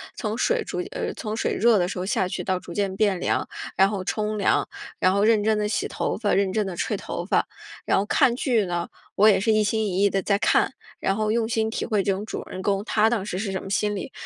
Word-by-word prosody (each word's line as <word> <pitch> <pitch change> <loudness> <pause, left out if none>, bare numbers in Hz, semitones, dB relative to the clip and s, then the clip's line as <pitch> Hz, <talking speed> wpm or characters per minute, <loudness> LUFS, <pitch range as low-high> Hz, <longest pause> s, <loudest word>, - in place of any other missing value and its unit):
从 215 -1 -3
水 475 - +1
逐 - - -4
渐 - - -7
呃， - - -3
从 215 -2 -5
水 - - 0
热 230 -1 +4
的 175 - +1
时 185 - -5
候 185 - -2
下 190 -2 0
去 185 - -4
到 185 -1 -1
逐 170 - -10
渐 195 -2 -1
变 200 -3 +1
凉， - - 0 0.3
然 195 +1 +5
后 195 -3 -3
冲 215 +2 -2
凉， - - +2 0.3
然 185 - +3
后 200 +1 +2
认 215 -2 +4
真 215 0 +2
地 210 - 0
洗 - - -1
头 - - -2
发， 210 -2 0
认 195 -1 +2
真 215 -2 +1
地 180 - -5
吹 - - -1
头 - - -5
发。 - - +2 0.4
然 - - +2
后 195 - +1
看 250 +1 +3
剧 240 -5 +1
呢， 175 -1 -2 0.3
我 215 +2 +6
也 195 - +4
是 220 +2 +2
一 215 - +3
心 220 +1 0
一 190 +1 0
意 200 - +5
地 195 0 0
在 200 +1 +1
看， - - +2 0.3
然 195 - 0
后 215 0 0
用 230 -1 +1
心 220 -1 0
体 225 - -3
会 210 -4 +1
这 195 - +1
种 195 +2 -5
主 - - -5
人 185 - -6
公， 200 0 0
他 220 -1 +3
当 220 -5 -1
时 185 -3 -4
是 200 -2 -2
什 190 - -3
么 - - -8
心 205 +1 0
理。 200 - -5
205 Hz, 295 characters per minute, -24 LUFS, 195-220 Hz, 0.4 s, 我